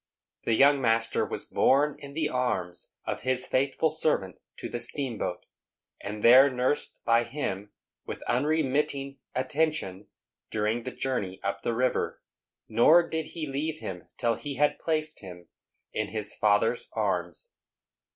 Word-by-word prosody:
The 115 - +2
young 140 +2 +5
master 115 -2 +2
was - - -4
borne 145 +2 +3
in 140 -1 -10
the 155 -1 +1
arms 95 -9 -2
of - - -3
his 130 +1 +1
faithful 140 +4 +1
servant 150 - 0 0.2
to - - -5
the 120 - -4
steamboat, 115 -11 -3 0.6
and 105 +1 -6
there 130 +4 +8
nursed 130 +2 -1
by 115 0 +4
him 105 -6 -4 0.4
with - - -6
unremitting 140 0 0 0.2
attention 130 -7 -1 0.4
during 110 +2 -1
the 130 - -3
journey 100 -10 -3
up 100 0 -2
the 115 - -1
river; 125 +1 0 0.5
nor 155 +10 +5
did 160 -1 -3
he 160 - -2
leave 150 +3 -3
him 90 - -7
till 120 -2 +1
he 125 +5 -5
had 145 +2 +2
placed 155 -1 0
him 90 -3 -11 0.4
in - - -1
his 105 0 -3
father's 105 +3 +2
arms. 90 -6 -2
125 Hz, 140 wpm, -28 LUFS, 105-145 Hz, 0.6 s, there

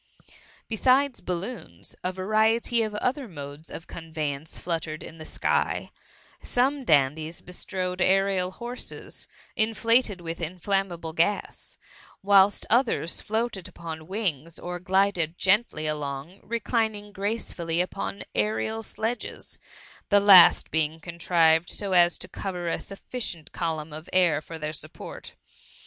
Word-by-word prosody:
Besides 255 +4 +2
balloons, 180 - -5
a 185 - 0
variety 215 +5 +2
ci 225 - +2
other 245 +6 -2
modes 145 -2 -8
of 165 - -7
conveyance 155 -2 -5
fluttered 165 -2 -3
in 165 - -10
the 155 - -8
sky* - - 0 0.5
Some 270 +3 +1
dandies 155 - +2
bestrode 180 0 -4
aerial 190 -1 +3
horses, 240 +6 -6 0.3
inflated 225 0 +2
wHh 165 -1 -5
inflammable 175 -1 -2
gas; 175 +5 -1 0.5
whilst 200 0 +5
others 235 -8 +2
floated 220 -3 -2
upon 160 -2 -8
wings, 170 -6 -2
or 175 0 -5
glided 185 -3 +1
gently 190 -5 +2
along, 150 +3 -4
reclining 220 -2 -1
gracefully 195 -5 -2
upon 100 - -2
aerial 110 +1 0
sledges, 225 - -4 0.5
the 205 - +6
last 195 -3 +8
being 160 0 0
contrived 165 -1 +2
so 200 -2 -2
as 175 -1 +5
to - - -5
cover 180 -3 -4
a - - -1
sufficient 195 -5 -5
column 160 -3 -3
of 155 +2 -8
air 175 -5 +4
for 165 +1 -8
their 155 0 -4
support. 150 - -8
180 Hz, 120 wpm, -26 LUFS, 160-210 Hz, 0.5 s, last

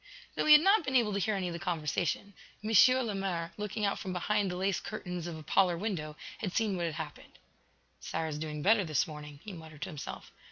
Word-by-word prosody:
Though - - 0
he 305 - +10
had 300 +1 +8
not 390 0 +5
been 265 -2 -2
able 225 -5 +4
to 200 - 0
hear 215 +2 +1
any 190 -2 -1
of 175 - -4
the 170 - -5
conversation, 175 +2 -1 0.3
M. 215 - -2 0.3
Lemaire, 190 -5 -2
looking 210 +1 -2
out 200 - 0
from 185 - -4
behind 200 +2 +1
the 180 - -3
lace 190 0 0
curtains 180 -2 -5
of 165 -2 -5
a 155 - -9
parlor 180 +1 +3
window, 165 -7 -3 0.2
had 190 -4 -3
seen 215 -4 +1
what 175 -1 -1
had 160 - -4
happened. 160 -2 -8 0.6
"Sara 160 0 -3
is 150 -1 -4
doing 150 -1 -4
better 210 +1 +5
this 155 -5 +1
morning," 150 -2 -9
he 205 - -7
muttered 160 -2 -9
to 190 - -4
himself. 150 -5 -7
180 Hz, 230 wpm, -31 LUFS, 160-205 Hz, 0.6 s, he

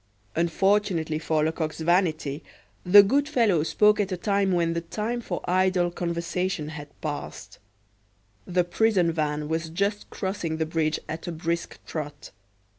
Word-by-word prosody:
Unfortunately 170 -1 +1
for 155 -1 0
Lecoq's 160 0 -2
vanity, 160 -4 +1 0.4
the 200 +3 +9
good 280 +8 +1
fellow 225 - +3
spoke 210 +7 +3
at 200 -2 0
a 185 - -1
moment 200 -1 +2
when 170 -1 +1
the 170 - -2
time 215 +8 -3
for 180 -6 -4
idle 185 -1 +2
conversation 170 -1 -2
had 150 -2 -8
passed. 145 -2 -6 0.9
The 180 0 +2
prison 180 0 +2
van 150 -2 -2
was 160 +1 -2
just 200 +5 -2
crossing 190 -5 -3
the 160 - 0
bridge 155 -1 0
at 160 +3 -6
a - - -2
brisk 170 +1 -3
trot. 145 -2 -6
170 Hz, 145 wpm, -26 LUFS, 160-195 Hz, 0.9 s, the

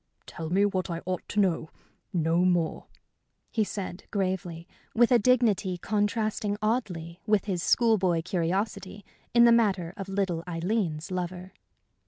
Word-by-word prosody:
"Tell 160 -2 -6
me 195 +4 +3
what 185 -3 -1
I 170 -1 -4
ought 185 0 -4
to 210 - -1
know 170 -5 +1 0.4
no 165 -1 +1
more," 175 -3 0 0.6
he 220 - +1
said, 195 -3 -6
gravely, 185 -4 -2 0.3
with 240 +2 +4
a 245 - +6
dignity 210 -6 +2
contrasting 205 +1 -1
oddly 185 -7 -2
with 210 -3 +2
his 185 -4 -2
school 225 +2 +3
boy 175 -3 +1
curiosity 190 +3 -2 0.3
in 235 - +7
the 235 - +7
matter 195 -7 +2
of 195 -1 -6
little 190 -4 -1
Aileen's 175 -1 -2
lover. 180 +1 -4
190 Hz, 145 wpm, -27 LUFS, 175-210 Hz, 0.6 s, in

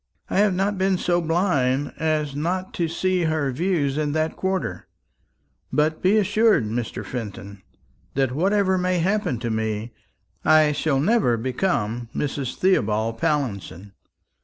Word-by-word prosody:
I - - +2
have 205 -2 +3
not 195 +1 0
been 190 0 +2
so 175 0 +1
blind 150 -6 +1
as 155 -3 -1
not 180 +5 -2
to 170 - -1
see 180 +1 0
her 155 -4 0
views 150 -1 0
in 150 -1 -1
that 155 +1 0
quarter. 190 0 -3 0.8
But 155 +1 +1
be 195 +4 +4
assured, 210 - +3
Mr. 115 +2 -4
Fenton, 100 -4 -7 0.5
that 135 -2 +1
whatever 190 +5 +2
may 180 0 +1
happen 185 - 0
to 115 -1 -2
me, 110 +1 -2 0.5
I 155 -1 +5
shall 145 -1 0
never 160 - +2
become 120 - -1
Mrs. 140 -3 -2
Theobald 115 - +1
Pallinson." 100 - -2
155 Hz, 135 wpm, -23 LUFS, 125-185 Hz, 0.8 s, I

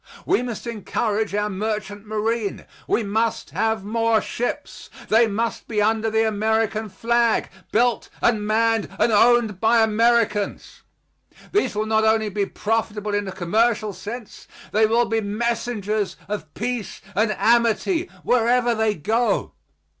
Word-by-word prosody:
We - - +2
must 245 -3 -5
encourage 215 -2 -2
our 210 0 0
merchant 210 0 -4
marine. 215 0 -2 0.2
We 230 - +1
must 220 +3 -1
have 220 -2 0
more 225 +1 +2
ships. 245 +3 -5 0.2
They 225 +1 +5
must 225 +2 -2
be 215 -2 -1
under 220 +1 +2
the 220 0 +2
American 220 0 0
flag; 235 +3 +1 0.2
built 240 +1 +1
and 220 -3 +2
manned 225 0 +1
and 235 - +2
owned 225 -2 +4
by 225 0 +4
Americans. 220 -1 +1 0.7
These 410 - +1
will 215 +1 0
not 220 0 +2
only 220 -1 +2
be 200 0 -1
profitable 210 -1 -2
in 205 -1 -1
a - - -4
commercial 215 +4 +1
sense; 225 +2 -8 0.2
they 215 +1 +4
will 235 +2 +3
be 225 -1 0
messengers 215 -1 -2
of 210 +1 -5
peace 240 -1 -4
and 215 +2 +1
amity 235 - +2
wherever 245 0 +2
they 220 -1 +1
go. 225 +9 0
220 Hz, 140 wpm, -22 LUFS, 210-230 Hz, 0.7 s, They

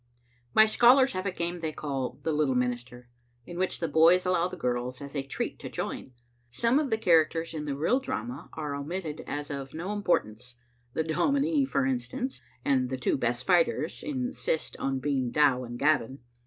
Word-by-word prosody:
My 220 - +8
scholars 250 +4 +5
have 185 +1 -3
a - - 0
game 175 0 -3
they 160 -2 -2
call 135 -4 -4
" - - -29
The 160 - 0
Little 150 -4 +1
Min 125 0 +2
ister," 125 0 -12 0.4
in 175 0 -7
which 185 - 0
the 165 - -1
boys 165 +4 +5
allow 180 -1 +2
the 185 0 -8
girls 125 -2 -2
as 140 +1 -9
a 140 - 0
treat 135 - -4
to - - -7
join. 130 - -5 0.4
Some 235 - +2
of 300 -3 -1
the 220 - +1
characters 165 -5 +2
in 150 -2 -4
the 140 -2 -3
real 165 - +2
drama 125 - -5
are 150 -2 -4
omitted 155 +2 -4
as 145 0 -4
of 140 0 -6
no 180 +6 -3
importance 125 - -1 0.2
— 120 0 -38
the 160 - +1
dominie, 280 - +2
for 275 0 0
instance 260 0 -3
— 125 - -33
and 130 -2 +2
the 130 - -2
two 125 - +1
best 125 -1 -1
fighters 170 -3 +2
insist 255 - -2
on 135 -1 -1
being 130 -2 -1
Dow 135 -2 +3
and 120 0 -7
Gavin. 135 -3 +1
155 Hz, 200 wpm, -28 LUFS, 130-185 Hz, 0.4 s, My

